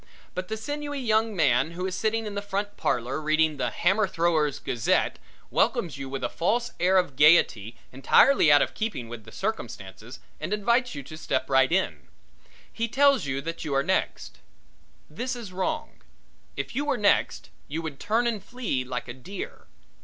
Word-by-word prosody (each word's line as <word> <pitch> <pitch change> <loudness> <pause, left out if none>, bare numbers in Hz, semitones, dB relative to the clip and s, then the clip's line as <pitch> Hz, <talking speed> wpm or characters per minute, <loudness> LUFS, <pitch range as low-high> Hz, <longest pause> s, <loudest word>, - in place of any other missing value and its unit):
But 185 0 -4
the 220 - -3
sinewy 290 +5 -4
young 220 -3 +1
man 140 -1 +2
who 180 +2 -4
is 190 - -3
sitting 220 +3 -1
in 210 - -5
the 200 - -3
front 205 0 -3
parlor 125 +5 -1
reading 155 0 +2
the - - 0
Hammer 195 +4 +2
Thrower's 165 -5 +1
Gazette, 115 -2 0 0.3
welcomes 155 -5 +1
you 135 -1 -5
with 135 0 -5
a - - +2
false 235 +8 -1
air 185 +2 +4
of 180 -7 +1
gaiety 130 -7 +4 0.2
entirely 155 - +5
out 145 -1 +7
of - - -5
keeping 210 - -4
with 115 -2 -9
the 110 - -12
circumstances 120 - -5 0.2
and 200 - -3
invites 235 +1 +1
you 140 - -6
to 155 - -10
step 140 -4 -2
right 135 +2 +4
in. 190 +2 -1 0.7
He 230 0 -1
tells 275 - +3
you 135 0 -2
that 165 +3 -5
you 145 -3 -2
are 135 - +3
next. 190 +3 -2 0.7
This 255 +2 -4
is 225 -6 -8
wrong 185 0 -3 0.6
if - - -4
you 280 - 0
were 285 -3 0
next 205 -2 +1 0.2
you 160 +3 -4
would 155 -4 -6
turn 225 +3 +1
and 225 -4 -1
flee 225 - -3
like 125 -1 -5
a 120 - -6
deer. 180 +10 -8
180 Hz, 185 wpm, -26 LUFS, 135-220 Hz, 0.7 s, out